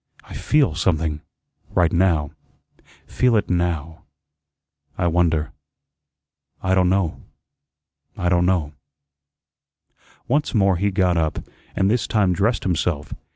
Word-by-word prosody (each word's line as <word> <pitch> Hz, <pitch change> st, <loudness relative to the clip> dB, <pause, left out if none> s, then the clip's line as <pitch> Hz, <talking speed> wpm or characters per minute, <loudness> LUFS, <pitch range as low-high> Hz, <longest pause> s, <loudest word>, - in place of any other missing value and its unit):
I -, -, -13 dB
feel 145 Hz, -, +1 dB
something 80 Hz, -2 st, -1 dB, 0.5 s
right 85 Hz, -2 st, +3 dB
now; 85 Hz, -5 st, +2 dB, 0.7 s
feel 125 Hz, -2 st, +1 dB
it 105 Hz, -, 0 dB
now. 85 Hz, -3 st, -2 dB, 1.0 s
I 90 Hz, -, -1 dB
wonder 80 Hz, -2 st, +1 dB, 1.1 s
I 95 Hz, 0 st, +1 dB
don' 90 Hz, -1 st, +3 dB
know 95 Hz, -4 st, 0 dB, 1.0 s
I 90 Hz, -, -1 dB
don' 90 Hz, 0 st, +2 dB
know." 85 Hz, -6 st, 0 dB, 1.5 s
Once 145 Hz, 0 st, 0 dB
more 95 Hz, -3 st, +3 dB
he 100 Hz, +3 st, +1 dB
got 90 Hz, -3 st, +1 dB
up, 80 Hz, -2 st, -1 dB, 0.3 s
and 95 Hz, -, +2 dB
this 115 Hz, +4 st, +1 dB
time 100 Hz, -4 st, +2 dB
dressed 105 Hz, +5 st, 0 dB
himself. 85 Hz, -4 st, -1 dB
90 Hz, 115 wpm, -21 LUFS, 80-95 Hz, 1.5 s, right